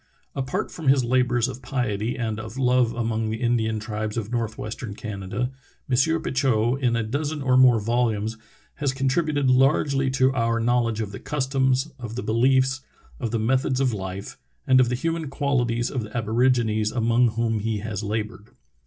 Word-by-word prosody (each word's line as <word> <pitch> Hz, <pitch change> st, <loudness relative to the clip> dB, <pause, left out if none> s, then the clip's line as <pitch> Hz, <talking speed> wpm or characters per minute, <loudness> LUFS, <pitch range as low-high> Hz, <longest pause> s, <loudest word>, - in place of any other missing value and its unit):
Apart 130 Hz, -2 st, -3 dB
from 160 Hz, -4 st, -7 dB
his 135 Hz, -1 st, +5 dB
labors 125 Hz, -1 st, +2 dB
of 130 Hz, -1 st, -7 dB
piety 120 Hz, -2 st, -2 dB
and 110 Hz, -3 st, -2 dB
of 110 Hz, +2 st, -8 dB
love 125 Hz, -2 st, +3 dB
among 115 Hz, -1 st, -1 dB
the 110 Hz, +1 st, -3 dB
Indian 115 Hz, -2 st, 0 dB
tribes 105 Hz, 0 st, -4 dB
of 110 Hz, -1 st, -3 dB
northwestern 110 Hz, -1 st, -4 dB
Canada, 105 Hz, +4 st, -4 dB, 0.4 s
M. 145 Hz, +6 st, +2 dB
Petitot, 130 Hz, -1 st, +1 dB
in 120 Hz, -2 st, +2 dB
a 115 Hz, -, 0 dB
dozen 145 Hz, +6 st, -3 dB
or 130 Hz, -1 st, +3 dB
more 130 Hz, -3 st, +6 dB
volumes, 110 Hz, -1 st, 0 dB, 0.4 s
has 140 Hz, -2 st, 0 dB
contributed 140 Hz, +1 st, +1 dB
largely 135 Hz, +1 st, +3 dB
to 130 Hz, 0 st, +2 dB
our 115 Hz, -2 st, +1 dB
knowledge 115 Hz, -1 st, +1 dB
of 105 Hz, -2 st, -4 dB
the 100 Hz, -, -7 dB
customs, 135 Hz, 0 st, 0 dB
of 120 Hz, -2 st, -6 dB
the 125 Hz, -, -4 dB
beliefs, 130 Hz, +3 st, +2 dB, 0.4 s
of 115 Hz, -, -2 dB
the 115 Hz, -, -1 dB
methods 130 Hz, +3 st, +1 dB
of 130 Hz, -3 st, +1 dB
life, 95 Hz, -1 st, -6 dB, 0.3 s
and 130 Hz, 0 st, +5 dB
of 125 Hz, -2 st, +4 dB
the 125 Hz, -, 0 dB
human 165 Hz, +2 st, -2 dB
qualities 125 Hz, -4 st, 0 dB
of 130 Hz, -, -2 dB
the 110 Hz, +2 st, -6 dB
aborigines 110 Hz, -1 st, +1 dB
among 115 Hz, +1 st, +3 dB
whom 115 Hz, -1 st, 0 dB
he 110 Hz, +1 st, -1 dB
has 105 Hz, -1 st, -4 dB
labored. 105 Hz, 0 st, -4 dB
120 Hz, 170 wpm, -24 LUFS, 110-130 Hz, 0.4 s, more